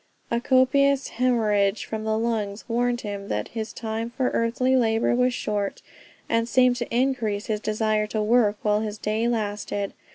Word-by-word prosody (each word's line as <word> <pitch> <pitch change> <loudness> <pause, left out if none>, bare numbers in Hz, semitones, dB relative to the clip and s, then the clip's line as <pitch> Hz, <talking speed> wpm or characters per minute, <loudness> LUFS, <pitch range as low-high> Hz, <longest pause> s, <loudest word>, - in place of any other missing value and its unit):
A 235 0 +1
copious 270 +2 +3
hemorrhage 220 -5 +1
from 220 0 -5
the 220 0 +1
lungs 220 -3 -2
warned 240 +1 0
him 200 -1 -6
that 105 - -3
his 220 -1 -5
time 225 0 -4
for 250 +2 -1
earthly 250 +3 +1
labor 225 -2 +2
was 250 +1 +2
short, 205 -4 -3 0.4
and 230 0 0
seemed 250 -1 +4
to 240 - -4
increase 235 -5 0
his 215 -1 -1
desire 215 0 0
to 215 0 -1
work 215 -2 +3
while 210 0 +2
his 215 -1 -4
day 215 +2 -1
lasted. 205 -3 -2
225 Hz, 165 wpm, -25 LUFS, 210-245 Hz, 0.4 s, seemed